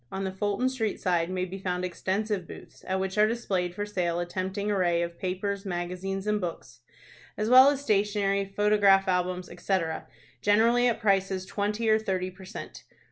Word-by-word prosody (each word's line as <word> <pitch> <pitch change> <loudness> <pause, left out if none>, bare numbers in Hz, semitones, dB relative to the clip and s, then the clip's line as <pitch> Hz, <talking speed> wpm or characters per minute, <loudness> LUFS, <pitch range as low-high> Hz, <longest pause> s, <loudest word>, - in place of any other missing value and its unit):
On 195 - -3
the 190 - -2
Fulton 205 +5 -1
Street 225 -6 -2
side 175 -2 +1
may 185 0 -1
be 190 +2 -7
found 180 -1 -2
extensive 190 +1 -2
booths, - - -12
at 190 0 0
which 190 +2 -2
are 210 - +6
displayed 190 -6 -2
for 205 - -2
sale 175 -4 -1
a 175 - -1
tempting 190 +3 -3
array 175 -3 +2
of 170 0 -6
papers, 195 +2 -2
magazines, 185 +1 -4
and 210 0 0
books, 145 -8 -6 0.6
as 215 +1 -1
well 260 +2 +9
as 280 -1 -1
stationery, 200 -3 +1
photograph 200 -1 +3
albums, 180 0 0
etc., 165 -5 -2 0.3
generally 230 +4 +4
at 235 -2 0
prices 195 -2 +1
twenty 210 +3 -2
or 220 0 +4
thirty 185 -3 -2
per 190 +1 -13
cent. - - -9
195 Hz, 180 wpm, -27 LUFS, 180-210 Hz, 0.6 s, well